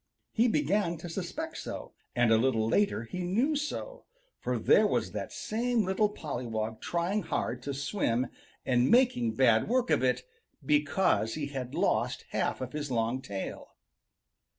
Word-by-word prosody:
He 235 Hz, +2 st, +3 dB
began 170 Hz, -1 st, +1 dB
to 170 Hz, -, -8 dB
suspect 195 Hz, -, -4 dB
so, -, -, -6 dB, 0.2 s
and 120 Hz, -2 st, +3 dB
a 110 Hz, -, +6 dB
little 115 Hz, -3 st, +2 dB
later 200 Hz, -, +2 dB
he 180 Hz, +10 st, -6 dB
knew 230 Hz, -, +1 dB
so, 300 Hz, +12 st, -4 dB, 0.3 s
for -, -, -1 dB
there 470 Hz, -, +5 dB
was -, -, 0 dB
that -, -, -5 dB
same 230 Hz, 0 st, 0 dB
little 190 Hz, +3 st, +2 dB
pollywog 115 Hz, -, -4 dB
trying 175 Hz, +5 st, 0 dB
hard 125 Hz, -9 st, -2 dB
to 140 Hz, +2 st, -4 dB
swim 130 Hz, -, 0 dB, 0.4 s
and 125 Hz, 0 st, +3 dB
making 230 Hz, -, +3 dB
bad 115 Hz, -4 st, +4 dB
work 250 Hz, 0 st, +2 dB
of -, -, +3 dB
it, 125 Hz, 0 st, +2 dB, 0.4 s
because 150 Hz, -, +2 dB
he 145 Hz, -2 st, -3 dB
had 125 Hz, -2 st, -4 dB
lost -, -, 0 dB
half -, -, -1 dB
of 130 Hz, +1 st, -5 dB
his 150 Hz, -1 st, -3 dB
long 120 Hz, +1 st, 0 dB
tail. 100 Hz, -5 st, -6 dB
150 Hz, 155 wpm, -30 LUFS, -, 0.4 s, a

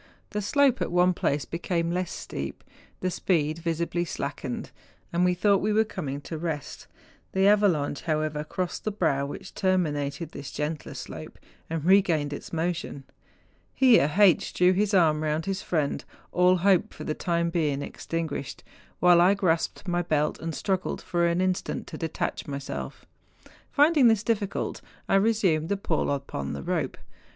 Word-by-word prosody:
The 210 Hz, -, -2 dB
slope 265 Hz, +5 st, +3 dB
at -, -, -1 dB
one 180 Hz, +1 st, +4 dB
place 145 Hz, -4 st, -1 dB
became 170 Hz, 0 st, -2 dB
less 180 Hz, 0 st, -2 dB
steep, 70 Hz, 0 st, -6 dB, 0.4 s
the 185 Hz, -, 0 dB
speed 160 Hz, -3 st, 0 dB
visibly 170 Hz, +1 st, -1 dB
slackened, 140 Hz, -5 st, -5 dB, 0.4 s
and 175 Hz, +1 st, +2 dB
we 180 Hz, 0 st, +3 dB
thought 200 Hz, +1 st, +3 dB
we 215 Hz, -, +1 dB
were 220 Hz, +1 st, +4 dB
coming 145 Hz, -10 st, -5 dB
to 160 Hz, +2 st, -6 dB
rest; 160 Hz, -4 st, -5 dB, 0.5 s
the 190 Hz, +1 st, +3 dB
avalanche, 190 Hz, -9 st, +3 dB
however, 155 Hz, -2 st, -1 dB
crossed 180 Hz, +3 st, -4 dB
the -, -, 0 dB
brow 150 Hz, -8 st, 0 dB
which 145 Hz, -, -8 dB
terminated 160 Hz, -5 st, 0 dB
this 140 Hz, 0 st, -7 dB
gentler 150 Hz, +1 st, -4 dB
slope, -, -, -8 dB, 0.3 s
and 160 Hz, -1 st, -3 dB
regained 170 Hz, -6 st, +3 dB
its -, -, -8 dB
motion. 165 Hz, -4 st, -3 dB, 0.7 s
Here 235 Hz, -, +5 dB
H. 200 Hz, -5 st, +5 dB
drew 180 Hz, +1 st, +5 dB
his 205 Hz, +2 st, +1 dB
arm 155 Hz, -4 st, +4 dB
round 155 Hz, +1 st, -1 dB
his 195 Hz, -1 st, -2 dB
friend, 155 Hz, -5 st, -1 dB, 0.3 s
all 180 Hz, +1 st, +4 dB
hope 185 Hz, 0 st, +2 dB
for -, -, -8 dB
the 155 Hz, -, -2 dB
time 170 Hz, +1 st, -1 dB
being 150 Hz, -5 st, 0 dB
extinguished, 155 Hz, -5 st, -4 dB, 0.4 s
while 175 Hz, -1 st, +6 dB
I 185 Hz, +3 st, +5 dB
grasped 180 Hz, 0 st, 0 dB
my 175 Hz, 0 st, +1 dB
belt 150 Hz, -3 st, 0 dB
and 165 Hz, -1 st, -4 dB
struggled 190 Hz, -2 st, -2 dB
for 170 Hz, -1 st, +1 dB
an 170 Hz, +1 st, +1 dB
instant 185 Hz, -1 st, -1 dB
to -, -, -7 dB
detach 165 Hz, -2 st, -3 dB
myself. 140 Hz, -1 st, -6 dB, 0.7 s
Finding 295 Hz, -3 st, +5 dB
this 220 Hz, -2 st, +3 dB
difficult, 210 Hz, -4 st, -2 dB, 0.3 s
I -, -, 0 dB
resumed 195 Hz, -6 st, +2 dB
the 200 Hz, -, +1 dB
pull 165 Hz, -5 st, -1 dB
upon 140 Hz, -, -3 dB
the 70 Hz, -1 st, -5 dB
rope. -, -, -2 dB
170 Hz, 160 wpm, -27 LUFS, 150-190 Hz, 0.7 s, while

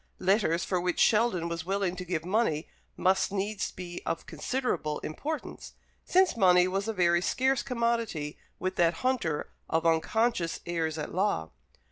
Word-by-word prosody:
Letters 185 Hz, -3 st, +2 dB
for 180 Hz, -2 st, 0 dB
which 180 Hz, -1 st, -1 dB
Sheldon 215 Hz, -6 st, +3 dB
was 170 Hz, -1 st, -3 dB
willing 190 Hz, 0 st, -1 dB
to 180 Hz, -, -4 dB
give 170 Hz, -2 st, -3 dB
money 180 Hz, -6 st, +1 dB, 0.3 s
must 190 Hz, +1 st, +2 dB
needs 200 Hz, +1 st, -2 dB
be 175 Hz, -1 st, -7 dB
of -, -, -3 dB
considerable 155 Hz, -, -2 dB
importance, 295 Hz, -, -5 dB, 0.3 s
since 370 Hz, -3 st, +3 dB
money 180 Hz, -4 st, +5 dB
was 195 Hz, +3 st, -2 dB
a 225 Hz, -, -1 dB
very 175 Hz, -3 st, +3 dB
scarce 260 Hz, +6 st, +1 dB
commodity 235 Hz, -, -1 dB, 0.2 s
with 185 Hz, 0 st, -3 dB
that 170 Hz, -1 st, +3 dB
hunter 200 Hz, -, 0 dB, 0.2 s
of 160 Hz, +1 st, 0 dB
unconscious 170 Hz, +3 st, +1 dB
heirs 160 Hz, -2 st, -1 dB
at 150 Hz, -, -5 dB
law. 180 Hz, -, 0 dB
185 Hz, 150 wpm, -29 LUFS, 165-225 Hz, 0.3 s, money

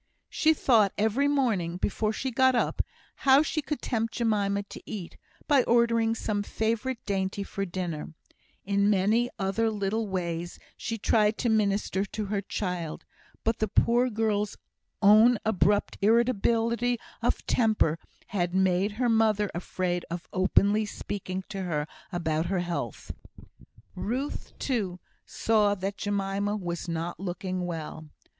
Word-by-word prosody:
She 315 Hz, -1 st, +3 dB
thought 220 Hz, -9 st, +4 dB
every 220 Hz, +7 st, +2 dB
morning, 220 Hz, -12 st, +1 dB
before 215 Hz, +3 st, 0 dB
she 260 Hz, +4 st, -3 dB
got 260 Hz, +1 st, +4 dB
up, -, -, +1 dB, 0.4 s
how 275 Hz, +2 st, +5 dB
she 310 Hz, 0 st, -1 dB
could 300 Hz, 0 st, -4 dB
tempt 225 Hz, -2 st, -1 dB
Jemima 205 Hz, -3 st, +1 dB
to 200 Hz, -, -11 dB
eat, 190 Hz, -5 st, -6 dB, 0.3 s
by 285 Hz, -3 st, +5 dB
ordering 230 Hz, -1 st, +3 dB
some 210 Hz, -2 st, -1 dB
favourite 230 Hz, +5 st, -1 dB
dainty 195 Hz, 0 st, -1 dB
for 195 Hz, 0 st, -4 dB
dinner; 170 Hz, -4 st, -5 dB, 0.5 s
in 200 Hz, +1 st, +2 dB
many 210 Hz, +5 st, +3 dB
other 195 Hz, +4 st, +1 dB
little 215 Hz, +1 st, -1 dB
ways 175 Hz, -2 st, -3 dB, 0.2 s
she 225 Hz, 0 st, -4 dB
tried 215 Hz, 0 st, +2 dB
to 240 Hz, -, 0 dB
minister 200 Hz, -2 st, +1 dB
to 210 Hz, +1 st, -4 dB
her 200 Hz, 0 st, -1 dB
child; 180 Hz, -5 st, -4 dB, 0.4 s
but 225 Hz, +1 st, 0 dB
the 220 Hz, -, +1 dB
poor 240 Hz, +5 st, +3 dB
girl's 210 Hz, -2 st, -1 dB, 0.5 s
own 215 Hz, +4 st, +7 dB
abrupt 205 Hz, -1 st, +2 dB
irritability 235 Hz, +2 st, +2 dB, 0.2 s
of -, -, 0 dB
temper 215 Hz, -9 st, +2 dB, 0.3 s
had 180 Hz, -3 st, -1 dB
made 190 Hz, +2 st, +2 dB
her 245 Hz, +3 st, 0 dB
mother 220 Hz, -3 st, +2 dB
afraid 175 Hz, 0 st, -2 dB
of 170 Hz, +1 st, -5 dB
openly 200 Hz, +3 st, +3 dB
speaking 195 Hz, -2 st, -5 dB
to 195 Hz, -2 st, -4 dB
her 155 Hz, -5 st, -1 dB, 0.3 s
about 160 Hz, -2 st, -1 dB
her 185 Hz, 0 st, 0 dB
health. 175 Hz, -1 st, -4 dB, 0.8 s
Ruth, 260 Hz, +6 st, -4 dB
too, 200 Hz, -9 st, -2 dB, 0.3 s
saw 210 Hz, -2 st, +2 dB
that 195 Hz, +1 st, -4 dB
Jemima 200 Hz, 0 st, -1 dB
was 175 Hz, -4 st, -4 dB
not 170 Hz, +1 st, -3 dB
looking 185 Hz, -1 st, -3 dB
well. 160 Hz, -2 st, -6 dB
205 Hz, 135 wpm, -28 LUFS, 185-225 Hz, 0.8 s, own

